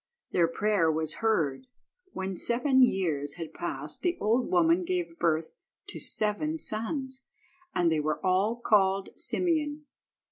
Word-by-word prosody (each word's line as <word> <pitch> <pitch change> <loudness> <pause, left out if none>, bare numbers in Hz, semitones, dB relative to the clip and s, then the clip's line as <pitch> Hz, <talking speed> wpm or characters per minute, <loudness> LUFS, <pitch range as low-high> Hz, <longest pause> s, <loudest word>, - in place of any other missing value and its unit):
Their 170 -2 +3
prayer 190 -2 +1
was 155 0 -2
heard. 215 - 0 0.4
When 190 - -4
seven 255 +7 +2
years 160 - +1
had 165 -2 -7
passed 150 -3 -5
the 355 -1 0
old 230 +4 +1
woman 175 0 +3
gave 175 -1 -3
birth 160 -1 +1 0.4
to - - -7
seven 220 +10 +1
sons, 260 +2 -2 0.5
and 175 -2 +3
they 160 - +1
were 155 0 -1
all 190 +5 +2
called 195 -4 +2
Simeon. 305 -4 -1
190 Hz, 135 wpm, -28 LUFS, 165-240 Hz, 0.5 s, Their